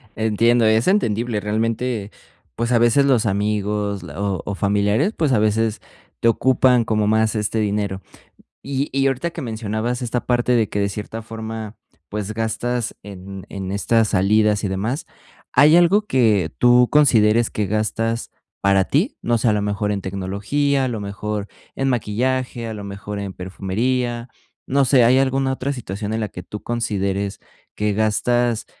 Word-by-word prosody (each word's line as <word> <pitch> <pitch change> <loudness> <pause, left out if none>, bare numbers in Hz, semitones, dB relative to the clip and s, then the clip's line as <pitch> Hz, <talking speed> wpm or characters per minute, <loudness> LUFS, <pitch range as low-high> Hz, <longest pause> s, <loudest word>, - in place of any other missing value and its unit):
Entiendo, 115 +2 +2
es 110 +4 +3
entendible. 115 - +1
Realmente, 110 +1 -2 0.4
pues, 115 +1 -2
a 120 - +4
veces 120 +4 +4
los 125 -5 +3
amigos 105 -1 -1
la 80 0 -9
o 100 -2 -1
o 100 - -3
familiares, 105 - +1
pues, 155 -5 +1
a 110 - +3
veces 110 +1 +1 0.4
te - - +2
ocupan 125 +1 +3
como 105 -1 +1
más 110 +1 +2
este 105 +1 -1
dinero. 100 -2 -1 0.6
Y 140 +1 -2
y 135 +1 +2
ahorita 135 +6 -1
que 170 - -7
mencionabas 115 0 -3
esta 120 0 -2
parte 125 0 +1
de 115 -4 +2
que, 100 - -2
de 100 - +1
cierta 105 +3 -6
forma, 110 -1 -7 0.3
pues 105 0 -4
gastas 115 +2 -2
en 95 -1 -9
en 95 -1 -5
estas 110 +2 +2
salidas 105 +2 +2
y 100 - +1
demás, 110 - -2 0.5
¿hay 155 +3 +6
algo 180 +5 +4
que 110 - +2
tú 125 0 +5
consideres 115 -6 +4
que 105 -2 -2
gastas 115 +2 -1 0.3
para 100 -1 +3
ti? 175 - 0
No 120 0 +1
sé, 115 - 0
a - - +3
lo 105 - 0
mejor 105 0 -1
en 100 -1 -2
tecnología, 100 +10 -1
a - - 0
lo 115 -3 -3
mejor 100 +1 -4 0.3
en 135 0 0
maquillaje, 125 +1 -1
a 110 - -5
lo 105 - -7
mejor 100 +1 -6
en 100 -1 -5
perfumería, 120 +7 -2 0.4
no 140 0 +2
sé, 125 -1 +5
¿hay 125 +3 +5
alguna 135 0 +1
otra 135 +2 -2
situación 105 -3 -5
en 110 - -1
la 105 - -1
que 90 - -9
tú 105 +2 -8
consideres 100 -4 -2 0.4
que 105 -1 0
gastas, 110 +2 +1
110 Hz, 170 wpm, -21 LUFS, 100-125 Hz, 0.6 s, hay